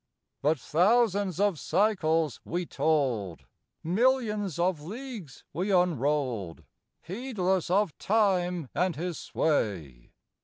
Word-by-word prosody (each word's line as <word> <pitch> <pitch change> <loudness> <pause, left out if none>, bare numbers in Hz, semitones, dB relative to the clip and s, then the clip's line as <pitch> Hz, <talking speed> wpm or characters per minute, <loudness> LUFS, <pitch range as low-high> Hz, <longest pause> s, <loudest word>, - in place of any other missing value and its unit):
But 155 +2 +2
thousands 200 - +2
of 200 -6 +2
cycles 165 - +1
we 175 +1 -3
told, 130 - -1 0.4
Millions 210 - +1
of 175 -2 0
leagues 215 - -8
we 180 +7 -2
unrolled, 140 - 0 0.4
Heedless 190 -3 -1
of 190 -2 +2
Time 180 - +1
and 180 -1 0
his 175 +1 -4
sway. 85 - -2
175 Hz, 100 wpm, -28 LUFS, 150-205 Hz, 0.4 s, But